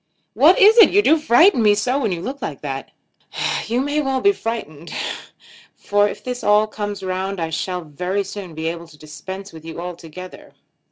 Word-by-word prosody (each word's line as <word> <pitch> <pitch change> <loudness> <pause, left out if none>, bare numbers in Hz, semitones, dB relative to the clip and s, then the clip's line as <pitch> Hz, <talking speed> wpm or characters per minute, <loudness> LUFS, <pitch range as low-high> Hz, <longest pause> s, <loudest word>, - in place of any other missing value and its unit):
"What - - +5
is 445 +1 +7
it? 445 - +9
You 410 +2 +3
do 320 -3 +4
frighten 300 +2 +5
me 210 -1 +5
so 250 +6 0
when 220 -7 -1
you 170 -1 -4
look 275 +2 -5
like - - -5
that." - - -5 0.8
"You 240 +3 0
may 290 +2 0
well 270 -2 -1
be 400 - +4
frightened, 170 - -6 0.8
for 205 0 +1
if 210 - -9
this 250 +1 -5
all 210 +1 +4
comes 205 -2 -5
round 190 +1 -3
I 165 -1 -3
shall 180 +3 -3
very 180 +6 -3
soon 195 -4 -8
be 160 +1 -5
able 170 +1 -4
to 155 -2 -17
dispense 190 +6 -9
with 160 -1 -11
you 165 0 -8
altogether. 175 0 -9
200 Hz, 190 wpm, -20 LUFS, 170-250 Hz, 0.8 s, it